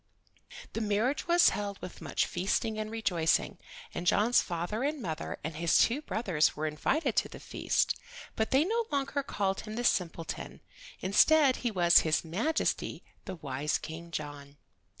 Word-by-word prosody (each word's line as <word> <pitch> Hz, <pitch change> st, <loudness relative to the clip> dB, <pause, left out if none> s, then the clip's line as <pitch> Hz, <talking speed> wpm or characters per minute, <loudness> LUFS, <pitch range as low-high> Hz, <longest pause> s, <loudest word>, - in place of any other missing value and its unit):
The 225 Hz, -, -2 dB
marriage 220 Hz, +9 st, 0 dB
was 345 Hz, 0 st, +6 dB
held 200 Hz, -1 st, -4 dB
with 180 Hz, -, -9 dB
much -, -, 0 dB
feasting 215 Hz, +4 st, -1 dB
and 215 Hz, 0 st, -3 dB
rejoicing, 180 Hz, -8 st, 0 dB, 0.3 s
and 175 Hz, -, -4 dB
John's 225 Hz, +7 st, +4 dB
father 175 Hz, +6 st, -3 dB
and 295 Hz, +1 st, -1 dB
mother 165 Hz, -8 st, -4 dB
and 160 Hz, 0 st, -4 dB
his 170 Hz, 0 st, +3 dB
two 250 Hz, +6 st, +3 dB
brothers 195 Hz, -, +1 dB
were 155 Hz, -, -3 dB
invited 155 Hz, -, 0 dB
to -, -, +2 dB
the -, -, -10 dB
feast. -, -, 0 dB, 0.4 s
But 220 Hz, -, 0 dB
they 275 Hz, +4 st, +3 dB
no 460 Hz, +4 st, 0 dB
longer 280 Hz, 0 st, -1 dB
called 195 Hz, -7 st, -2 dB
him 215 Hz, 0 st, -7 dB
the 240 Hz, -, -2 dB
simpleton; 165 Hz, -7 st, -2 dB, 0.4 s
instead 265 Hz, +8 st, +5 dB
he 245 Hz, -, -1 dB
was 175 Hz, -5 st, +5 dB
His 155 Hz, +1 st, +1 dB
Majesty, 225 Hz, -, -1 dB, 0.2 s
the 190 Hz, -, -5 dB
wise 145 Hz, -1 st, -2 dB
King 165 Hz, +1 st, -8 dB
John. 145 Hz, -3 st, -7 dB
200 Hz, 160 wpm, -30 LUFS, 165-245 Hz, 0.4 s, was